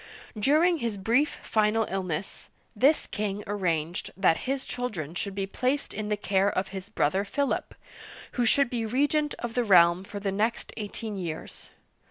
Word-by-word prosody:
During 310 - +3
his 230 -5 -2
brief 240 +9 +2
final 215 +1 +2
illness, 185 -2 -3 0.3
this 275 +8 +4
king 205 0 -3
arranged 175 -5 -1
that 190 -4 +4
his 270 -1 -1
children 215 - -4
should 195 +2 -4
be 195 -1 -1
placed 255 +8 -1
in 210 0 -4
the 210 - +1
care 200 -1 +2
of 185 -1 -2
his 190 0 -7
brother 190 -1 +1
Philip, 275 +8 -2 0.6
who 245 - 0
should 265 +2 +3
be 235 -2 -1
regent 290 +6 +1
of 240 -1 -5
the 245 - +1
realm 175 -3 +6
for 205 +1 -7
the 200 -1 -1
next 215 +4 -1
eighteen 215 0 -5
years. 165 -3 -6
210 Hz, 165 wpm, -27 LUFS, 195-245 Hz, 0.6 s, realm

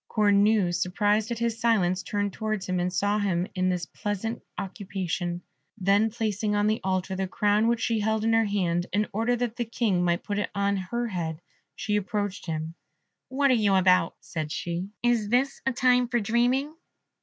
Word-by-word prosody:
Cornue, 205 -2 +3
surprised 205 +5 +1
at 235 - -2
his 230 0 -1
silence, 190 -6 +2
turned 205 -1 -2
towards 215 -3 -3
him, 185 -1 0
and 180 +1 0
saw 205 +3 +1
him 185 -4 0
in 185 -1 +1
this 180 -1 -1
pleasant 210 +3 -4 0.2
occupation; 180 -3 -4 0.3
then 200 +3 +3
placing 215 -2 -1
on 205 0 +2
the 215 +1 +1
altar 190 0 -1
the 190 0 -2
crown 210 +3 +2
which 235 -1 +1
she 230 -2 +1
held 220 +1 0
in 225 0 +2
her 225 0 +4
hand, 180 -4 0
in 210 +2 +2
order 225 +4 +1
that 240 -1 -3
the 240 - 0
King 220 -6 0
might 175 0 +1
put 205 -1 -2
it 205 - -2
on 200 0 +1
her 235 +6 -3
head, 165 -5 -3 0.4
she 210 - -1
approached 205 -1 -3
him. 160 0 -3 0.5
"What 275 +1 +2
are - - +5
you 210 -5 +3
about," 185 -2 +4
said 155 -3 -5
she; 175 +4 -3
"is 235 -4 +2
this 260 +4 +1
a - - +3
time 250 0 +3
for 240 0 +1
dreaming?" 245 +7 +1
205 Hz, 190 wpm, -26 LUFS, 185-225 Hz, 0.5 s, are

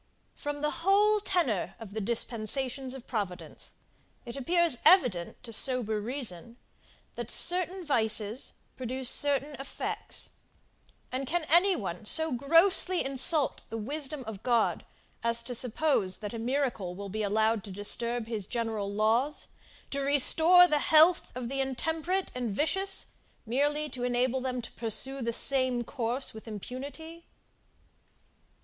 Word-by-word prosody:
>From 290 -1 -6
the 300 0 -2
whole 415 +3 +3
tenor 340 - -1
of 215 -3 -11
the 220 - -4
dispensations 245 +4 -2
of 260 - -11
Providence, 200 -6 -6 0.5
it 235 - -8
appears 330 0 +1
evident 225 - +3
to 230 - -6
sober 220 -3 +1
reason, 235 -3 -5 0.6
that - - -7
certain 360 +1 +2
vices 220 -3 0 0.2
produce 255 0 -1
certain 285 0 0
effects: 270 - -3 0.8
and 260 +1 -4
can 345 +1 -1
any 360 +4 +5
one 190 -1 -6
so 320 +7 +4
grossly 335 +7 +4
insult 275 +2 +3
the 225 - -5
wisdom 275 +4 -3
of 220 -4 -9
God, 235 -3 0 0.4
as 235 0 0
to 245 - -6
suppose, 245 -4 +1
that 210 +1 -7
a 230 - -5
miracle 235 -7 -2
will 200 +1 -7
be 215 +3 -4
allowed 220 +1 0
to 200 - -9
disturb 235 +4 +2
his 220 -4 -4
general 225 -4 -3
laws, 225 +8 0 0.4
to 280 - -2
restore 320 +6 +6
to 300 -3 +1
health 320 +3 +5
the 255 +2 -3
intemperate 320 +8 -2
and 250 -2 -4
vicious, 385 - 0 0.4
merely 290 +6 -1
to 250 -3 -7
enable 250 +1 0
them 250 -1 -4
to - - -9
pursue 240 +4 -2
the 235 -1 -2
same 255 0 +1
course 245 +1 -3
with 220 +1 -12
impunity? 280 - -8
255 Hz, 135 wpm, -28 LUFS, 225-300 Hz, 0.8 s, restore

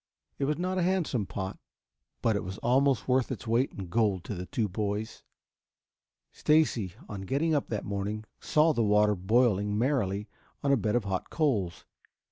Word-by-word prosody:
It 140 - +1
was 150 +2 0
not 185 +2 -1
a - - +2
handsome 170 - 0
pot, 95 -1 -5 0.6
but 115 -2 +3
it 100 - -1
was 95 +2 -6
almost 135 +1 +3
worth 130 -1 +2
its - - -5
weight 120 +4 +2
in 95 - -7
gold 100 -1 +1
to 105 - -5
the 90 -1 -6
two 110 -3 0
boys. 105 +2 -3 1.1
Stacy, 125 - +2
on 100 -2 -6
getting 140 - 0
up 145 - +1
that 110 -3 -3
morning, 100 +2 -3
saw 155 +1 +3
the 120 - 0
water 105 0 +4
boiling 105 +1 +2
merrily 105 -5 0 0.4
on 140 - +2
a - - +6
bed 105 -3 0
of 120 - +2
hot 95 -2 -3
coals. 105 - 0
110 Hz, 175 wpm, -29 LUFS, 100-135 Hz, 1.1 s, a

